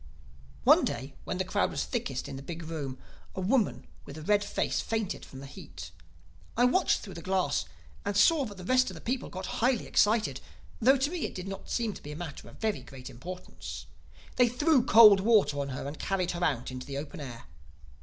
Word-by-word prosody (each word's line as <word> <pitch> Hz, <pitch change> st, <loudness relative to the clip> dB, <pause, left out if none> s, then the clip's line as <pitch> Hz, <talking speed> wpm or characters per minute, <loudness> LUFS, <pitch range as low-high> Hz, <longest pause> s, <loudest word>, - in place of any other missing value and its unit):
"One -, -, +7 dB
day, -, -, -3 dB
when -, -, -3 dB
the -, -, -1 dB
crowd -, -, +1 dB
was -, -, -2 dB
thickest -, -, -3 dB
in -, -, -6 dB
the 135 Hz, -, -7 dB
big 165 Hz, +3 st, -7 dB
room, 150 Hz, -5 st, -5 dB, 0.4 s
a -, -, -4 dB
woman 210 Hz, +4 st, +1 dB, 0.2 s
with 140 Hz, -, -10 dB
a 155 Hz, -, -7 dB
red 205 Hz, +4 st, +3 dB
face -, -, -1 dB
fainted 220 Hz, -4 st, -2 dB
from 135 Hz, -, -10 dB
the -, -, -8 dB
heat. 135 Hz, -, -10 dB, 0.7 s
I 245 Hz, -, +5 dB
watched 345 Hz, +9 st, +3 dB
through 195 Hz, -, -8 dB
the 170 Hz, -, -8 dB
glass 185 Hz, -, 0 dB, 0.4 s
and 205 Hz, -1 st, -1 dB
saw 290 Hz, +6 st, +5 dB
that 205 Hz, -4 st, -8 dB
the 185 Hz, -, -8 dB
rest 255 Hz, +2 st, +3 dB
of 185 Hz, -, -8 dB
the -, -, -8 dB
people 250 Hz, +8 st, -3 dB
got 185 Hz, +1 st, -6 dB, 0.2 s
highly 245 Hz, 0 st, +2 dB
excited—though 230 Hz, +4 st, +1 dB
to 275 Hz, +4 st, 0 dB
me 355 Hz, -4 st, -2 dB
it -, -, -12 dB
did 185 Hz, +1 st, -5 dB
not 195 Hz, 0 st, -7 dB
seem 230 Hz, -3 st, 0 dB
to -, -, -11 dB
be 150 Hz, -, -8 dB
a -, -, -6 dB
matter 160 Hz, -3 st, -7 dB
of -, -, -15 dB
very 220 Hz, -1 st, -1 dB
great 130 Hz, -1 st, -10 dB
importance. 180 Hz, +9 st, -8 dB, 0.5 s
They 245 Hz, -1 st, +5 dB
threw 275 Hz, +2 st, +3 dB
cold 215 Hz, -4 st, +8 dB
water 200 Hz, -8 st, +3 dB
on 140 Hz, 0 st, -2 dB
her 130 Hz, +1 st, -5 dB
and 145 Hz, +2 st, -7 dB
carried 185 Hz, -2 st, 0 dB
her 175 Hz, 0 st, -3 dB
out 135 Hz, -7 st, 0 dB
into 130 Hz, 0 st, -7 dB
the 140 Hz, -1 st, -4 dB
open 145 Hz, +1 st, -6 dB
air. 125 Hz, -5 st, -7 dB
190 Hz, 215 wpm, -29 LUFS, 150-230 Hz, 0.7 s, cold